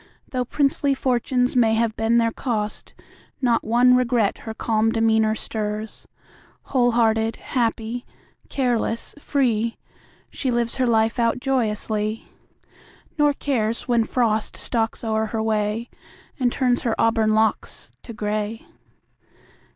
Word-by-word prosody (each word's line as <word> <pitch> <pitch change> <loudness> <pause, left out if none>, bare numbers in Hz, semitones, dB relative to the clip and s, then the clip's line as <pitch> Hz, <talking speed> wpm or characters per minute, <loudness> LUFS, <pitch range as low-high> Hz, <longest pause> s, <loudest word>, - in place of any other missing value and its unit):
Though 250 -1 -1
princely 280 +1 +1
fortunes 250 -1 0
may 225 -3 +4
have 225 -1 0
been 225 +1 +2
their 230 -1 +3
cost, 215 -4 -4 0.4
Not 240 -3 +2
one 245 +3 +4
regret 240 -4 +1
her 220 - -6
calm 225 0 +1
demeanor 220 -1 +2
stirs. 215 0 -5 0.6
Whole 245 -3 +1
hearted, 225 -1 +2
happy, 235 -1 -2 0.4
careless, 240 -3 -1
free, 235 -6 0 0.5
She 265 - -3
lives 235 0 0
her 255 -1 +2
life 225 0 +2
out 230 +1 +2
joyously, 220 -4 -1 0.9
Nor 295 -1 +4
cares 235 -6 -2
when 235 -2 +3
Frost 220 -2 0
stalks 225 -1 -2
o'er 220 -1 0
her 220 0 -2
way 215 +1 -1 0.5
And 250 -2 +2
turns 250 -1 +1
her 230 -2 -1
auburn 225 -1 +3
locks 220 0 -1
to - - -10
gray. 215 +1 -3
230 Hz, 125 wpm, -23 LUFS, 220-245 Hz, 0.9 s, may